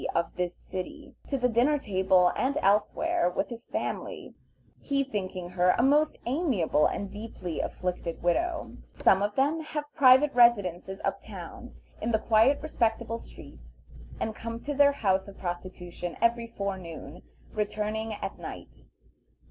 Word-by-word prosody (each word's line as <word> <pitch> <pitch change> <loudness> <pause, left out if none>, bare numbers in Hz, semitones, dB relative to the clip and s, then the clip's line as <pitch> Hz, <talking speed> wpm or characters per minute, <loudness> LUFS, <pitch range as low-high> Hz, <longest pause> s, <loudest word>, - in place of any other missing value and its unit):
of 170 - 0
this 180 -1 -2
city, 285 +10 -7
to 275 - -1
the 250 -1 +2
dinner 250 +6 +3
table 190 -6 +3
and 275 +3 0
elsewhere, 210 - +2
with 180 - -2
his 235 -1 -9
family, - - -4 0.5
he 275 -1 0
thinking 185 -7 -4
her 180 0 +3
a - - +3
most 295 +3 +3
amiable 240 - +2
and 200 -1 -4
deeply 205 -6 -6
afflicted 180 -2 -3
widow. 330 - 0 0.2
Some 190 - +4
of 205 0 -1
them 290 +4 +2
have 300 -1 -5
private 265 +2 +6
residences 200 -6 +3
up - - -1
town, - - -9 0.3
in 225 - -1
the 225 - +3
quiet 225 +6 +4
respectable 230 -5 -1
streets, - - -14 0.4
and 220 - -2
come 230 +1 -5
to 290 - -3
their 285 0 +6
houses 190 -7 +1
of 200 - -11
prostitution 175 -1 -5
every 235 0 +2
forenoon, 185 -7 -6 0.3
returning 215 +1 -2
at - - -6
night. - - -9
220 Hz, 145 wpm, -28 LUFS, 185-270 Hz, 0.5 s, private